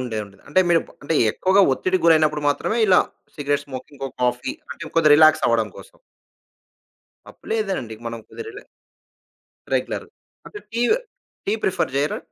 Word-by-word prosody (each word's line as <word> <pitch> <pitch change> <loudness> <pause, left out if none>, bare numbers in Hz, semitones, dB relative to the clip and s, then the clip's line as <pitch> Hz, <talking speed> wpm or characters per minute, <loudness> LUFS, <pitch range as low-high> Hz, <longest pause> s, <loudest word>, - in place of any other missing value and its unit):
ఉండేఉంటది. 105 -5 -5
అంటే 185 +6 +4
మీరు 170 -1 +4 0.2
అంటే, 165 - -1 0.2
ఎక్కువగా 190 +7 +3
ఒత్తిడి 185 +7 0
గురైనప్పుడు 155 -2 +4
మాత్రమే, 220 +10 0
ఇలా 185 -2 +6 0.3
సిగరెట్ 145 -1 -1
స్మోకింగ్ 130 +1 -9
ఇంకో 135 0 -4
కాఫీ 125 0 0 0.2
అంటే, - - -8
ఇంకొద్ది 165 -2 +3
రిలాక్సవ్వడం 150 -8 +4
కోసం. - - -14 1.3
తప్పులేదండి. 195 - -3
మనం 115 -1 -5
కుదిరలే. 440 -2 -9 1.1
రెగ్యులర్ - - -2 0.4
అంటే 415 - -9
టీ 235 - -2 0.7
టీ 200 - +1
ప్రిఫర్ 185 - 0
జేయరా? 145 +2 0
150 Hz, 125 wpm, -22 LUFS, 130-185 Hz, 1.3 s, ఇలా